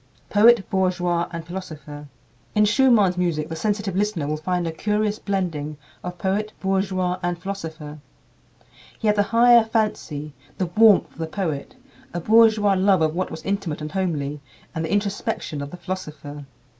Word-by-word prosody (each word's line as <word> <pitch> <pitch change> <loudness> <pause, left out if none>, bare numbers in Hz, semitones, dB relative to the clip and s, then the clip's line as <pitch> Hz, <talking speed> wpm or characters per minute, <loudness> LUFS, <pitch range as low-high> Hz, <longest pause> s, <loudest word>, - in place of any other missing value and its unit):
Poet, 220 0 +5
Bourgeois, 180 -3 0
and 170 -1 -6
Philosopher. 150 -5 -8 0.5
In 210 0 +5
Schumann's 210 -6 +4
music 160 -3 -1
the 160 - -4
sensitive 205 +1 -1
listener 200 -6 0
will 150 +1 -1
find 175 +3 -2
a 165 - -2
curious 210 +4 -1
blending 160 -7 -3 0.3
of 180 0 -6
poet, 200 +4 -1
bourgeois, 190 -2 0
and 175 -1 -1
philosopher. 160 -5 -7 1.0
He - - -6
had 210 -1 +4
the 205 - +3
higher 235 0 +6
fancy, 210 -10 -2 0.2
the 185 - 0
warmth 220 -2 +6
of - - -20
the 160 - -2
poet, 160 - -4 0.4
a - - 0
bourgeois 215 +1 +5
love 190 -2 +3
of 155 -1 +1
what 185 +2 -2
was 160 - -8
intimate 195 -6 -2
and 150 0 -6
homely, 150 -6 -2 0.3
and 160 - -3
the 160 - -3
introspection 200 -7 -2
of 140 - -5
the 180 - -9
philosopher. 155 -6 -7
185 Hz, 160 wpm, -23 LUFS, 160-205 Hz, 1.0 s, higher